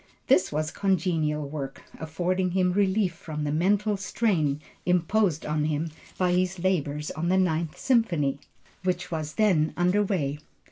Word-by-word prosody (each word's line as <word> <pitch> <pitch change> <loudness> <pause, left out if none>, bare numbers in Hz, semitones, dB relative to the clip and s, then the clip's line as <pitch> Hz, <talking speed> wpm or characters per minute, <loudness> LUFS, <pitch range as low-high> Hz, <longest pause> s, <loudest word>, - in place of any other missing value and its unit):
This 190 -8 +3
was 155 +1 -1
congenial 165 -6 0
work, 140 -2 -6 0.2
affording 180 +4 -1
him 180 -1 +2
relief 195 -1 +2
from 155 -2 -6
the 145 - -1
mental 200 +6 +2
strain 185 -8 0 0.2
imposed 180 -1 +1
on 150 0 0
him 155 +1 -1 0.3
by 180 -1 +2
his 185 +1 +1
labors 150 -5 -1
on 170 +2 -2
the 190 - +3
Ninth 165 -3 0
Symphony, 170 - +1 0.4
which 180 -1 -2
was 155 -2 -3
then 180 -8 +2
under 180 +4 +3
way. 150 -8 -1
175 Hz, 145 wpm, -26 LUFS, 155-190 Hz, 0.4 s, This